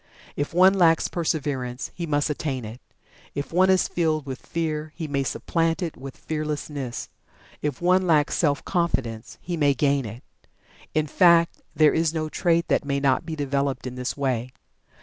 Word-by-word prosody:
If 145 - -2
one 185 +3 +6
lacks 170 -4 +4
Perseverance, 135 -7 -2
he 170 -1 -5
may 145 -1 +1
attain 145 -4 -2
it; 110 +3 -9 0.5
if 140 +3 -4
one 185 +2 +4
is 190 -1 +4
filled 155 -4 0
with 130 -1 -7
Fear, 155 -2 -3
he 160 - -4
may 140 -1 0
supplant 165 +5 -1
it 165 - -4
with 135 +1 -9
Fearlessness; 150 -4 -4 0.5
if 150 +1 -3
one 185 +1 +3
lacks 150 -3 +3
Self 145 -4 +1
confidence, 130 - -2
he 175 - -3
may 145 -3 +3
gain 140 0 +1
it. 110 +4 -9 0.7
In 155 -1 +2
fact, 170 +1 +4
there 155 -1 +5
is 165 0 +1
no 155 -1 -1
trait 170 +1 +1
that - - +2
may 140 -1 -1
not 140 +3 +1
be 160 - -3
developed 140 -2 -1
in 125 - -4
this 125 +2 -4
way. 130 -3 -1
150 Hz, 170 wpm, -24 LUFS, 135-165 Hz, 0.7 s, one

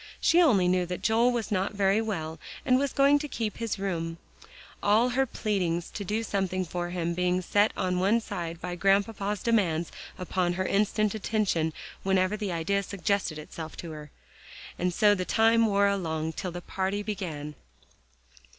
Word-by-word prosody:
She 345 +2 +4
only 210 - +4
knew 180 0 +2
that 180 0 -5
Joel 230 +2 +4
was 235 -3 -2
not 195 +1 0
very 200 +2 +3
well, 160 -8 -4 0.3
and 255 0 +4
was 280 -1 0
going 280 +1 +4
to 295 - -4
keep 225 -6 -3
his 230 -3 -2
room; 170 -4 -3 0.6
all 220 +4 +4
her 265 +2 +1
pleadings 180 -7 -1
to 205 - -5
do 215 +4 -1
something 190 -3 -1
for 175 +1 -4
him 170 -1 -2
being 180 +1 +1
set 205 +4 +3
one 185 +4 +2
side 170 -7 -5
by 180 0 -4
Grandpapa's 200 +2 +1
demands 175 -8 +1 0.3
upon 180 -1 -1
her 185 +1 -2
instant 210 +1 +1
attention 205 -7 0 0.3
whenever 190 +1 +2
the 205 -3 -3
idea 175 +4 0
suggested 200 -3 -1
itself 155 +1 -8
to 170 - -7
her. 150 -1 -9 0.7
And 180 0 +1
so 205 +3 +4
the 185 -3 -1
time 225 +3 +4
wore 200 -1 +3
along 160 -5 -1
till 180 +3 -4
the 175 +1 -6
party 195 +3 -2
began. 160 -8 -4
195 Hz, 170 wpm, -28 LUFS, 175-215 Hz, 0.7 s, She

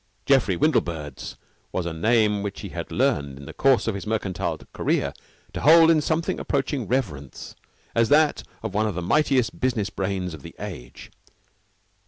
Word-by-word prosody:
Geoffrey 125 -10 +3
Windlebird's 80 - -1 0.4
was 90 - -2
a 85 - -3
name 105 +3 +2
which 100 -1 -5
he - - -6
had - - -6
learned, 70 -2 0
in 70 - -11
the - - -9
course 135 -5 +3
of 110 - +1
his 100 +2 -6
mercantile 95 -6 -2 0.2
career, - - 0 0.4
to - - -4
hold 165 +3 +7
in 155 -2 +3
something 160 +2 -1
approaching 135 -3 -1
reverence 90 - -3 0.4
as 115 -1 +2
that 150 0 +4 0.2
of 110 -3 -4
one 105 +1 +1
of 105 - -3
the 90 - -3
mightiest 130 - +1
business 110 -5 0
brains 95 -2 -3
of 80 - -9
the - - -11
age. - - -9
105 Hz, 170 wpm, -24 LUFS, 90-135 Hz, 0.4 s, hold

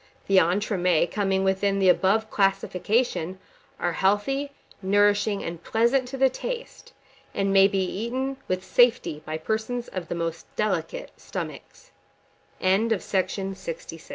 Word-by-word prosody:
The 195 -1 +5
entremets 180 -1 +1
coming 195 -2 +1
within 195 +1 +1
the 195 -1 +3
above 200 +4 +3
classification, 195 -1 0 0.4
are 175 - 0
healthy, 210 +11 +1 0.3
nourishing, 205 +1 +2
and 170 0 -6
pleasant 235 +6 +2
to 270 +2 -6
the 265 0 +5
taste, 485 - -6 0.4
and 195 0 +1
may 195 0 +7
be 195 -1 0
eaten 255 +8 -3
with 185 0 -1
safety 230 -11 +3
by 155 0 -2
persons 220 +7 -3
of 185 -3 -5
the - - -3
most 165 -1 -4
delicate 185 -6 -2
stomac - - -5
195 Hz, 120 wpm, -25 LUFS, 185-225 Hz, 0.4 s, may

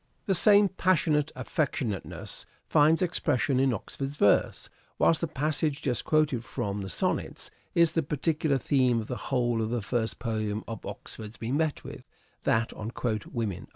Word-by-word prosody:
The 195 - +2
same 205 +3 +6
passionate 170 -6 +1
affectionateness 130 - -3 0.2
finds 155 +4 +4
expression 145 -6 +1
in 135 0 +3
Oxford's 135 +4 -4
verse, 100 -8 +2 0.3
whilst 165 - +3
the 170 - 0
passage 150 0 -1
just 125 -4 -1
quoted 150 -6 +2
from 100 -3 -3
the 95 - -5
Sonnets - - -1 0.2
is 170 -2 +5
the 165 - +1
particular 150 0 0
theme 130 -3 +2
of - - -7
the 125 - -4
whole 120 -3 +1
of 110 - -1
the 120 -2 -2
first 115 +1 -1
poem 110 -2 -2
of 115 -2 -6
Oxford's 110 0 -8
we 115 +2 -3
met 150 0 0
with: - - -10 0.4
that 110 +1 +2
on 110 +2 -6 0.2
" 105 -1 -4
Women." 110 -6 -3
135 Hz, 160 wpm, -28 LUFS, 115-155 Hz, 0.4 s, same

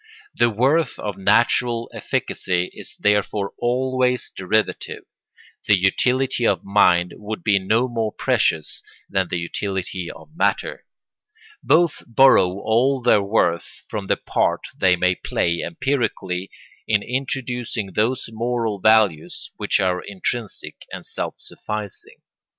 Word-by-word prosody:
The 120 - +3
worth 135 +9 +1
of 105 -2 -4
natural 115 +4 +2
efficacy 90 -1 -2
is - - -10
therefore 105 -1 +1
always 125 +1 0
derivative; 105 +3 -1 0.6
the 100 - +6
utility 125 +7 +1
of 95 -3 +1
mind 90 -3 +3
would 105 +1 -6
be 100 -3 +3
no 110 +6 +1
more 115 -3 -2
precious 80 -6 0 0.3
than 95 -2 0
the 90 - -2
utility 90 +1 -3
of 155 - -13
matter; - - -1 0.8
both 170 0 +3
borrow 125 -4 +6
all 125 +4 +2
their 105 - +5
worth 100 -4 0
from 100 -2 -4
the - - +2
part - - 0
they 95 -1 +4
may 90 +1 +2
play 85 -1 -1
empirically 115 - -2 0.4
in 105 -2 +2
introducing 125 -5 -3
those 120 +4 0
moral 115 -2 -2
values 105 -6 +2
which - - +1
are 90 -1 +1
intrinsic 100 +3 -4
and - - -7
self - - -4
sufficing. 105 -2 -7
105 Hz, 120 wpm, -22 LUFS, 95-125 Hz, 0.8 s, the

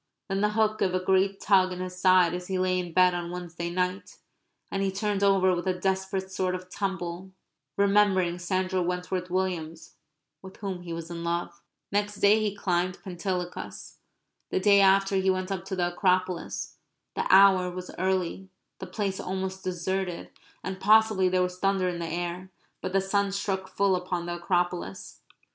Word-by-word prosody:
Then 195 +1 0
the 210 - +3
hook 215 0 +1
gave 185 -1 +1
a - - +2
great 190 +1 +2
tug 190 -2 +3
in 180 - -5
his 185 0 -5
side 185 -2 +5
as 180 0 -5
he 190 - -1
lay 185 0 +1
in 175 -1 -5
bed 180 +1 +5
on 175 -1 -3
Wednesday 175 -1 -5
night; 180 +2 -2 0.5
and 195 - -1
he 195 -1 +1
turned 200 0 -1
over 190 -2 +4
with 175 +2 -4
a 185 - +1
desperate 190 0 -1
sort 185 -1 -1
of 185 0 -9
tumble, 190 -2 -4 0.5
remembering 195 -3 +3
Sandra 185 +1 -1
Wentworth 180 +1 -2
Williams 175 -3 -3 0.4
with 190 0 -12
whom 190 -3 -5
he 175 -1 -8
was 165 0 -6
in 170 0 -5
love. 170 0 -3 0.3
Next 205 +1 0
day 205 +2 +4
he 210 -2 -1
climbed 180 -2 0
Pentelicus. 180 -1 -5 0.5
The - - 0
day 200 +1 +5
after 195 0 +4
he 190 0 +2
went 185 +1 -1
up 190 -2 -3
to 190 0 -4
the 175 -1 0
Acropolis. 185 -1 -1 0.4
The - - -1
hour 190 -1 +6
was 180 0 -7
early; 190 0 -1 0.3
the - - -6
place 195 -3 -3
almost 190 0 -4
deserted; 185 0 -3 0.3
and 190 0 -5
possibly 215 -3 +4
there 185 0 +2
was 180 0 -4
thunder 195 -1 +1
in 175 -1 -2
the 170 - -3
air. 175 +2 -4 0.3
But 185 - -4
the 195 - +3
sun 200 +1 0
struck 195 -1 -2
full 195 0 +1
upon 180 -1 -3
the 175 0 -4
Acropolis. 175 - -2
185 Hz, 180 wpm, -27 LUFS, 180-195 Hz, 0.5 s, hour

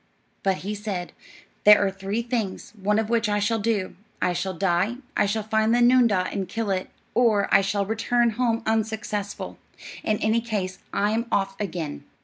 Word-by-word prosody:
But 195 -1 +1
he 210 - -2
said: 200 -4 -4 0.5
"There 210 0 +9
are 195 - 0
three 195 +4 -3
things, 220 -4 -3
one 210 +2 +2
of 220 -1 +1
which 230 -2 +2
I 205 - +1
shall 210 +2 +1
do: 205 -3 -1 0.2
I 180 - +1
shall 185 +2 -2
die; 190 +5 +1 0.2
I - - +3
shall 215 +2 -1
find 220 +1 +2
the - - +3
noondah 240 -7 +4
and 190 -2 -3
kill 225 0 -2
it; 185 -1 -2 0.2
or 220 -5 +3
I 195 - +7
shall 200 +1 0
return 230 +2 +1
home 230 0 0
unsuccessful. 220 -2 -2 0.4
In 215 - +1
any 220 +2 +1
case, 195 -5 -3
I'm 220 +3 0
off 195 -2 0
again." 165 - -4
210 Hz, 175 wpm, -25 LUFS, 195-225 Hz, 0.5 s, There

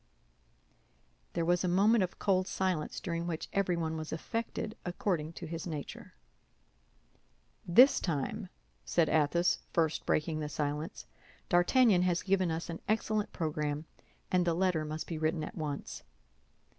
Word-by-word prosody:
There 170 -1 0
was 175 0 +2
a - - +1
moment 200 +4 +4
of 180 - -4
cold 185 -2 +1
silence, 185 -5 -1
during 170 -1 -3
which 165 -2 -3
everyone 170 -5 0
was 155 -1 -5
affected 225 +5 -3
according 175 -3 -2
to 170 - -7
his 165 +2 -5
nature. 150 -4 -7 1.5
"This 250 +11 +7
time," 145 -7 -2 0.3
said 170 -2 +2
Athos, 160 +3 +2
first 160 -2 +1
breaking 155 0 +1
the 150 -1 -3
silence, 150 +1 -3 0.4
"D'Artagnan 185 +3 +5
has 180 -1 +1
given 190 -2 +2
us 165 +1 -3
an 165 -1 -6
excellent 215 -1 0
program, 150 -2 -2 0.5
and 180 -1 +3
the 170 -1 +1
letter 180 -3 +1
must 155 +1 -4
be 165 -2 -5
written 155 0 0
at - - -6
once." 150 -4 -5
170 Hz, 140 wpm, -32 LUFS, 155-185 Hz, 1.5 s, This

